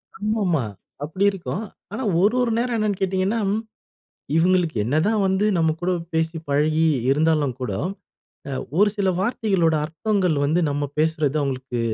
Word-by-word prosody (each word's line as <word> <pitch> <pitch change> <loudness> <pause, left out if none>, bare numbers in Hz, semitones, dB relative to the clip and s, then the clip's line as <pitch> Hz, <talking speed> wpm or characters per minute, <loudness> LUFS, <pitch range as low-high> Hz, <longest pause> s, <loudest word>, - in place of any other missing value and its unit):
ஆமாமா. 205 - 0 0.4
அப்டி 175 +7 -1
இருக்கும். 195 +2 -4 0.3
ஆனா, 230 +6 -4 0.2
ஒரு 215 +5 +3
ஒரு 240 -2 +1
நேரம் 240 0 0
என்னன்னு 210 -3 0
கேட்டிங்கன்னா, 190 +3 0 1.0
இவுங்களுக்கு 175 -2 +2
என்னதான் 170 - +1
வந்து 190 +2 +2
நம்ம 160 -1 +3
கூட 180 - +1 0.2
பேசி 160 +1 0
பழகி 155 +3 +2 0.3
இருந்தாலும் 150 -2 +2
கூட, 120 -6 -2 0.8
அ - - -4 0.3
ஒரு 205 +1 +6
சில 195 -2 +1
வார்த்தைகளோட 195 -7 +1
அர்த்தங்கள் 180 0 0
வந்து, 160 +5 +2
நம்ம 145 0 -2
பேசுறது 155 -2 +1
அவுங்களுக்கு 130 -3 -3
170 Hz, 135 wpm, -23 LUFS, 155-200 Hz, 1.0 s, ஒரு